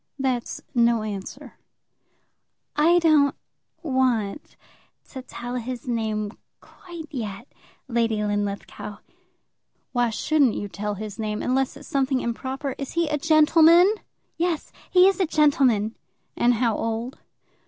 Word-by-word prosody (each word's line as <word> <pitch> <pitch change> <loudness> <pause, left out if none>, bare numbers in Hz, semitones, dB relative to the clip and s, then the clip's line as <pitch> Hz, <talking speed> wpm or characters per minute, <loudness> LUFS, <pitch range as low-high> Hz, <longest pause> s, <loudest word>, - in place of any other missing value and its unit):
"That's 260 -3 -2
no 235 -3 +3
answer." 200 -3 -7 1.2
"I 325 +4 +5
don't 310 -5 +4 0.5
want 255 -5 0 0.5
to 260 - -7
tell 245 0 -6
his 250 +1 -6
name 215 -3 -1 0.3
quite 345 -3 -11
yet, 225 -3 -5 0.4
Lady 230 -3 0
Linlithgow." 205 0 -3 0.9
"Why 245 -2 +1
shouldn't 275 +2 +2
you 205 - -3
tell 205 +1 -4
his 210 0 -7
name, 215 -1 -2
unless 265 +2 0
it's 290 - -12
something 270 -1 +1
improper? 265 +3 -3
Is 275 - -5
he 335 -2 +1
a 300 -1 -1
gentleman?" 325 +4 +6 0.4
"Yes; 335 -2 -1 0.2
he 365 0 +6
is 390 - +2
a 375 - +2
gentleman." 265 -9 +3 0.4
"And 245 0 +3
how 230 -1 +1
old?" 230 +3 -3
255 Hz, 120 wpm, -24 LUFS, 220-300 Hz, 1.2 s, gentleman